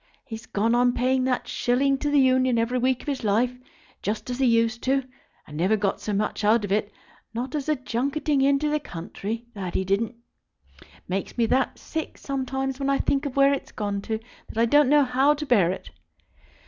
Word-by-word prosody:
He's 225 -1 -8
gone 220 +3 +1
on 245 0 +3
paying 255 +1 +1
that 255 -1 -1
shilling 270 +3 +1
to 295 - -1
the 290 -1 +4
Union 260 -2 +3
every 235 +2 +1
week 255 0 +1
of - - -17
his 275 -4 -2
life, 230 +4 +1 0.5
just 215 +4 -3
as 245 - -4
he 265 - +3
used 230 0 +2
to 270 +1 +2
do; - - -22 0.4
and 150 - -11
never 185 +7 +2
got 200 -2 -1
so 210 - -3
much 210 +1 -1
out 215 +1 +3
of 195 - -6
it, 205 0 0 0.4
not 250 +3 -3
as 300 -1 -2
a 305 - +3
junketing 275 +3 -1
into 280 +2 +3
the 300 0 +1
country. 210 - -6
That 190 -4 -5
he 190 - 0
didn't. 210 +5 0 0.7
It - - -18 0.2
makes 190 +5 -3
me 235 - +3
that 260 +4 +1
sick 320 -1 -5
sometimes 270 0 -3
when 275 0 -1
I 275 - +3
think 280 +1 0
of 265 - -7
where 275 0 +5
it's 280 - -4
gone 205 -1 -3
to, 220 - 0 0.3
that - - -9
I 230 - +4
don't 290 +3 +4
know 295 0 +6
how 270 +3 +3
to 300 +1 -5
bear 205 - +4
it. 190 - -7
250 Hz, 215 wpm, -25 LUFS, 220-275 Hz, 0.7 s, know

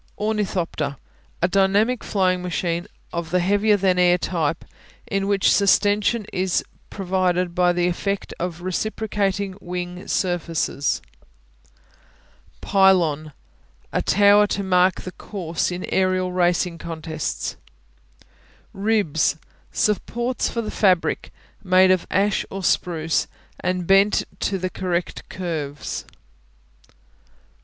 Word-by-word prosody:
Ornithopter 185 -9 -2 0.5
A - - +5
dynamic 200 +6 +2
flying 185 -2 +1
machine 175 0 -2 0.3
of 170 -1 -3
the 180 +2 +2
heavier 205 +3 +3
than 185 -2 +2
air 180 0 +5
type, 165 -3 -2 0.4
in 195 0 -1
which 200 -1 +3
sustension 205 +2 +3
is 185 -1 0 0.3
provided 180 -2 0
by 180 0 +3
the 175 0 +1
effect 200 +3 -2
of 175 -1 -4
reciprocating 200 0 -1
wing 180 0 -5
surfaces. 165 -5 -1 1.6
Pylon 170 -6 +3 0.6
A - - +1
tower 205 +1 +5
to 200 - -2
mark 185 0 +3
the 185 - -7
course 175 -4 -3
in 180 0 -4
aerial 185 -1 +1
racing 175 -1 +1
contests. 160 - -4 1.2
Ribs 195 -7 +1 0.3
Supports 235 +4 0
for 230 - -3
the 215 - -4
fabric, 185 -5 +1 0.3
made 185 0 +5
of 185 -2 +1
ash 200 +1 +1
or 195 0 -6
spruce 165 -3 +1 0.3
and 185 -1 -1
bent 195 +3 +4 0.2
to 195 - 0
the 185 0 -3
correct 180 -1 -3
curves. 155 -6 -4
185 Hz, 110 wpm, -22 LUFS, 175-200 Hz, 1.6 s, A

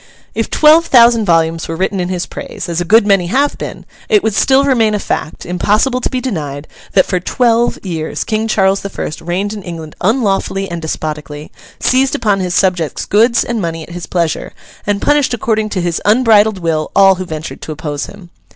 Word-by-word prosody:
If - - -2
twelve 315 +2 +5
thousand 235 -3 +5
volumes 165 -2 +1
were 165 - -4
written 190 +3 -1
in 180 0 -2
his 180 -1 -2
praise - - -7
(as 170 0 -2
a - - -2
good 215 +4 +5
many 195 -4 +2
have 275 +9 +1
been) - - -7 0.2
it 425 -4 +3
would 220 - 0
still 265 +7 +3
remain 230 -6 +2
a - - -1
fact, 160 - -4
impossible 215 +8 +1
to - - -1
be 255 - -2
denied, 155 - -4 0.3
that 190 - +4
for 185 - -1
twelve 235 +5 +1
years 160 -4 -3
King 220 0 -1
Charles 195 -2 +2
the 200 - -5
First 155 - -6
reigned 185 +5 -2
in 210 - -7
England 165 -4 -8
unlawfully 195 -3 0
and 170 -1 -4
despotically, 150 -1 -5 0.3
seized 260 +1 +2
upon 205 -3 +1
his 180 -1 -2
subjects' 180 -6 0
goods 230 +3 +3
and 235 -2 -3
money 165 -2 -3
at 170 - -12
his 175 -1 -7
pleasure, 170 -3 -2 0.3
and 205 -1 -1
punished 290 -4 +2
according 220 -1 -1
to 190 -3 -2
his 175 -1 -2
unbridled 220 -2 +4
will 160 -3 -1
all 195 -1 +6
who - - -1
ventured 155 -1 -7
to - - -6
oppose 150 -1 -4
him. 190 -4 -13
195 Hz, 200 wpm, -15 LUFS, 170-225 Hz, 0.3 s, all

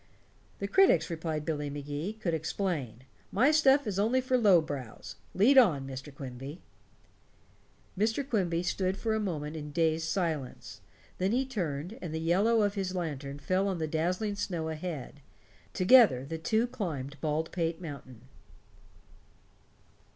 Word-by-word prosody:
"The 200 - -3
critics," 190 - +4
replied 160 -2 -3
Billy 150 -3 -2
Magee, 145 +6 -4
"could 205 -6 -3
explain. 160 - -3 0.3
My 255 +9 +4
stuff 285 -2 +4
is 200 -3 -2
only 230 +5 +3
for 255 0 0
low 205 -8 +6
brows. 140 -7 -6 0.2
Lead 255 +8 +6
on, 155 - +3
Mr. 135 +2 -7
Quimby." 135 +3 -8 1.4
Mr. 225 +7 0
Quimby 180 -8 0
stood 185 +1 -1
for 220 0 -1
a 220 - 0
moment 160 -7 -3
in 150 -1 -6
dazed 160 0 +1
silence. 160 -8 -3 0.4
Then 190 +2 +1
he 260 +2 +1
turned, 180 - -4
and 160 -3 -5
the - - -2
yellow 200 +7 +3
of 205 -1 +1
his 190 -2 -3
lantern 145 -5 -4
fell 185 +6 0
on 190 -2 -1
the 160 - -1
dazzling 180 +7 -1
snow 170 -5 -3
ahead. 155 -3 -6 0.5
Together 185 - +5
the 160 +3 -5
two 220 +8 +1
climbed 145 - -5
Baldpate 160 +2 -1
Mountain. 140 -8 -9
170 Hz, 145 wpm, -30 LUFS, 150-205 Hz, 1.4 s, low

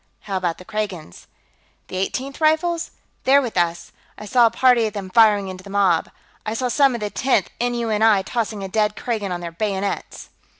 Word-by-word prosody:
"How 195 - -5
about 175 -3 -2
the 185 - -13
Kragans?" 190 - -5 0.6
"The 185 - -6
Eighteenth 265 +10 -3
Rifles? 320 +2 +1 0.3
They're 275 +2 +5
with 245 -5 -4
us. 170 -1 -1 0.3
I 210 - -9
saw 240 +2 +4
a - - +2
party 235 -1 +3
of 210 - -6
them 195 -2 -6
firing 210 -2 +5
into 185 0 -8
the 200 - -12
mob; 195 -5 +2 0.3
I 215 +1 -3
saw 250 +1 -1
some 275 0 +3
of 235 - -6
the 210 -1 -3
Tenth 255 -8 +1
N.U.N.I. 225 -4 +2
tossing 215 -1 -3
a - - -4
dead 210 +1 0
Kragan 215 -5 -3
on 175 -1 -3
their 170 -1 -6
bayonets...." 195 +2 -4
210 Hz, 190 wpm, -21 LUFS, 190-240 Hz, 0.6 s, They're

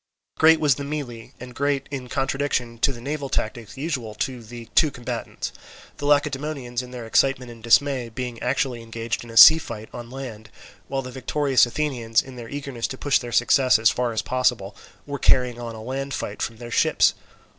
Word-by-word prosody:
Great 160 0 +6
was 150 -3 +4
the 140 - -6
melee, 140 -6 -6
and 125 0 -10
quite 140 0 0
in 130 -3 -5
contradiction 135 -3 -1
to 140 - +3
the 120 - -9
naval 140 +2 -4
tactics 115 -2 -3
usual 130 -8 -3
to 125 +2 -3
the 115 +1 -10
two 155 - +5
combatants; 120 -3 -5 0.5
the 145 - -3
Lacedaemonians 145 -3 0
in 125 - -10
their 125 -2 -7
excitement 125 +1 +1
and 115 -1 -13
dismay 125 +1 +3
being 120 0 -6
actually 130 -3 -1
engaged 115 +1 -4
in 120 - -12
a 115 - -6
sea 160 +6 +11
fight 110 -7 -8
on 120 -1 -8
land, 120 -5 -8 0.4
while 135 0 -2
the 125 - -7
victorious 135 +1 +2
Athenians, 120 -5 0
in 130 -1 -5
their 120 -2 -9
eagerness 140 -4 -4
to 130 - -7
push 145 0 +2
their 120 -1 -7
success 130 -2 +4
as 110 0 +4
far 125 -1 -1
as 110 - -2
possible, 125 -6 0 0.3
were 140 -1 -5
carrying 125 -2 +3
on 115 -1 -6
a 110 - -9
land 135 +3 -4
fight 105 - -5
from 115 0 -3
their 120 0 -9
ships. - - +3
125 Hz, 195 wpm, -24 LUFS, 115-140 Hz, 0.5 s, sea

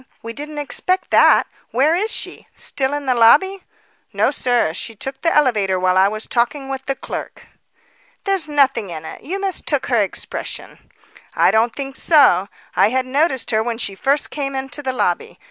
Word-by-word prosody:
We 230 0 -6
didn't 295 +3 -7
expect 360 +7 -1
that. - - +6 0.2
Where 275 +7 +2
is 415 +6 0
she? - - -6
Still 270 -1 -1
in 290 -1 -5
the 260 - +2
lobby?" 380 +12 +4 0.5
"No, - - +1
sir. 245 -10 +1
She 225 +5 -6
took 270 +5 -7
the 330 - +2
elevator 210 -10 +2
while 185 0 +2
I 190 +1 +5
was 215 +2 -4
talking 270 +3 -1
with 270 0 -5
the 275 - 0
clerk." - - -7 0.8
"There's 385 -6 0
nothing 270 -8 +2
in 160 -2 -7
it. - - -9
You 380 +5 -4
mistook 365 -7 -2
her 230 - +4
expression." 195 - -6 0.5
"I - - +4
don't 225 +1 +2
think 275 -1 -6
so. 205 - +4 0.3
I - - +4
had 260 +2 0
noticed 265 -1 0
her 220 -1 +2
when 230 0 -3
she 200 -4 -3
first 275 +9 0
came 275 -2 -3
into 265 +1 -5
the 265 -2 -2
lobby. 255 - -2
265 Hz, 180 wpm, -19 LUFS, 225-295 Hz, 0.8 s, that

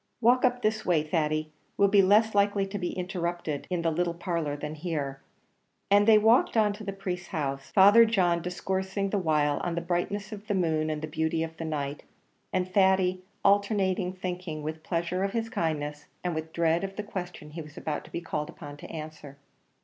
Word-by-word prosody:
"Walk 245 +2 +4
up 250 -1 +2
this 215 0 +1
way, 165 -4 +2
Thady; 155 -1 -1 0.3
we'll 200 - +5
be 200 0 +6
less 210 +3 +4
likely 200 -1 +2
to 195 +1 -5
be 180 - -2
interrupted 175 -5 -3
in 180 -2 -1
the 165 - +2
little 170 +1 -1
parlour 170 -4 -2
than 150 +1 -5
here;" 150 -4 -4 0.7
and 205 +1 +5
they 220 -1 +8
walked 225 +2 +4
on 210 -2 +4
to 210 +1 -9
the 200 - -3
priest's 185 -2 -5
house, 140 -4 -3
Father 205 +4 +7
John 180 -7 +2
discoursing 190 +2 -2
the 205 - +1
while 150 -4 +2
on 175 -1 -2
the - - 0
brightness 190 +4 -2
of 210 0 -8
the 205 - 0
moon 160 -4 +1
and 155 0 -3
the - - -2
beauty 160 +1 -1
of 160 0 -6
the 165 - -4
night, 145 -2 -3 0.5
and 185 -1 0
Thady 190 -1 +3 0.2
alternately 200 -2 +2
thinking 180 -4 -4
with 155 +1 -5
pleasure 170 +2 -1
of 195 - -1
his 225 -1 -1
kindness, 150 -8 -2 0.2
and 180 -1 -1
with 160 0 -4
dread 165 +1 +1
of 195 0 -4
the 210 - -4
questions 175 -6 -7
he 165 - -5
was 150 0 -12
about 150 -2 -3
to - - -15
be 170 - -4
called 150 -3 -3
upon 145 0 -9
to - - -10
answer. 155 -3 -8
175 Hz, 205 wpm, -28 LUFS, 155-200 Hz, 0.7 s, they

